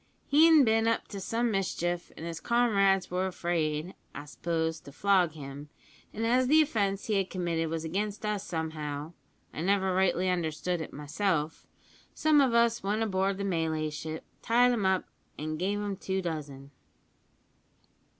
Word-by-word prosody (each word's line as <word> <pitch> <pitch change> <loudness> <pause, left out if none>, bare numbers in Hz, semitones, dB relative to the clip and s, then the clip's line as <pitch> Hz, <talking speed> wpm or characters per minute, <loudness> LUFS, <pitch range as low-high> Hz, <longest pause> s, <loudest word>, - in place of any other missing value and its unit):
He'n 315 +1 +6
bin 225 -1 +3
up 230 - 0
to 200 - -6
some 230 +4 -1
mischief, 175 -3 -2
an' - - -8
his 165 -1 -5
comrades 195 -6 +2
were 185 +1 0
afraid, 170 -2 -2 0.2
I 145 - -7
s'pose, 160 +1 -2
to 140 - -13
flog 180 +1 +2
him; 145 -1 -9 0.4
and 225 +2 -3
as 250 +2 +3
the 310 +4 +6
offence 200 -10 +1
he 215 -2 +1
had 195 -1 0
committed 170 -3 -1
was 165 0 -3
against 205 +5 -3
us 210 -2 -1
somehow 155 -3 -4 0.4
(I - - -5
never 190 +1 +2
rightly 185 -1 +2
understood 175 0 -1
it - - -6
myself), 155 +2 -2 0.5
some 305 -2 +4
of 255 -4 +2
us 235 0 +3
went 210 +3 0
aboard 195 -2 0
the 200 - -3
Malay 160 -4 -1
ship, 155 +1 -6 0.2
tied 245 +2 +4
him 215 -6 +1
up, 190 -1 +1 0.3
an' 155 +1 -4
gave 195 +4 -1
him 205 -1 -3
two 190 0 -2
dozen. 145 -5 -6
185 Hz, 160 wpm, -29 LUFS, 160-210 Hz, 0.5 s, He'n